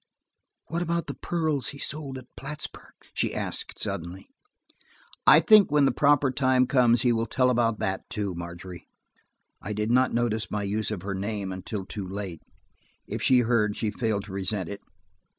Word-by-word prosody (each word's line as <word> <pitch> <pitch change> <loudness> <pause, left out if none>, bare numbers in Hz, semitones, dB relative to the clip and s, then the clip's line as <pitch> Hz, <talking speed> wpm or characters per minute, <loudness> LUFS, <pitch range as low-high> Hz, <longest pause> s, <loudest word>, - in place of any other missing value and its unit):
"What 170 +2 -3
about 170 0 -1
the - - -5
pearls 155 -7 -1
he 140 - -5
sold 140 -2 -4
at 130 - -10
Plattsburg?" 145 +2 -6 0.2
she - - -1
asked - - -4
suddenly. 95 -1 -5 1.0
"I - - +9
think 215 -3 +6
when 145 -1 +4
the - - +4
proper 145 -2 +3
time 130 0 +3
comes, 120 -2 +4
he 120 -2 +4
will 115 0 0
tell 125 +2 +2
about 115 -2 +2
that 95 -1 -3
too, 100 -3 -2
Margery." 85 +1 -8 0.7
I 105 - -4
did 105 +2 -1
not 130 +1 +4
notice 115 -2 0
my 105 -1 -2
use 105 +2 -1
of 100 -5 -4
her 100 0 -3
name 100 0 -3
until 95 +2 -5
too 100 -1 -6
late. 95 -4 -6 0.6
If - - -5
she 125 -1 +5
heard, 110 -3 +1
she 110 - -1
failed 110 -4 -1
to 100 - -10
resent 95 -1 -2
it. 100 - -7
110 Hz, 175 wpm, -27 LUFS, 100-130 Hz, 1.0 s, I